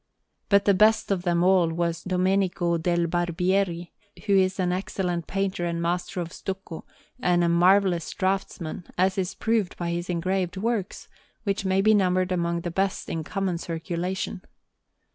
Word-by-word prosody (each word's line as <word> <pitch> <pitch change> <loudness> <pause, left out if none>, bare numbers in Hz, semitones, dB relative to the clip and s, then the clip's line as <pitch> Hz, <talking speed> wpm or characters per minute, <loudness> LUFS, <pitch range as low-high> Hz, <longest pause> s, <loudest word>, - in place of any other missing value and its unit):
But 200 0 +4
the 200 - +5
best 215 +2 +3
of 190 -3 +1
them 175 -1 +1
all 185 -2 +4
was 170 0 -2
Domenico 185 -2 +1
del 170 +1 +1
Barbieri, 175 +1 0 0.3
who 200 -2 +3
is 190 0 +2
an 180 -1 +1
excellent 180 -2 -2
painter 195 -2 -2
and 170 0 -2
master 175 +2 -2
of 170 0 -6
stucco, 190 -3 -6 0.3
and 175 -1 +2
a - - +3
marvellous 180 0 +3
draughtsman, 185 -3 -3
as 185 +2 +2
is 190 0 -2
proved 225 -4 0
by 170 -1 -2
his 175 +1 -3
engraved 180 +1 -1
works, 215 -1 -2 0.4
which 200 -1 -1
may 190 0 +2
be 215 +2 +5
numbered 185 -2 +2
among 170 -1 0
the 175 - -4
best 195 +2 -1
in 165 -1 -3
common 185 0 -2
circulation. 175 +3 -3
180 Hz, 160 wpm, -25 LUFS, 170-195 Hz, 0.4 s, the